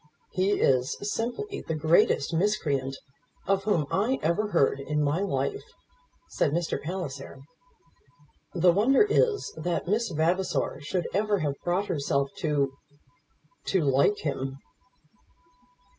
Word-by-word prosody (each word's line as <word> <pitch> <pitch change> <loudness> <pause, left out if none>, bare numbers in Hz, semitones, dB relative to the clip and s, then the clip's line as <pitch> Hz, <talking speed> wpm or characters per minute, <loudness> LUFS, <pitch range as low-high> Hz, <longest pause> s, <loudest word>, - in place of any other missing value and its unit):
"He 190 +2 +1
is 130 -6 +2
simply 245 - -3
the 160 - -3
greatest 155 0 +3
miscreant 150 -8 0 0.5
of 195 0 +1
whom 175 -8 +2
I 235 +7 +1
ever 170 +7 +1
heard 165 -8 +2
in 150 +2 -1
my 145 +4 +1
life," 410 - -1 0.7
said 145 - 0
Mr. 170 0 -1
Palliser. 145 -5 -5 1.2
"The 175 0 +5
wonder 230 - +4
is 430 0 +1
that 170 +2 -2
Miss 220 +4 +1
Vavasor 170 -2 0
should 175 +5 -2
ever 205 +2 +1
have 145 -2 0
brought 180 +3 0
herself 140 -5 -1
to 145 -5 0 0.9
to 190 - +1
like 140 +9 +3
him." 135 -2 -3
175 Hz, 120 wpm, -27 LUFS, 145-205 Hz, 1.2 s, The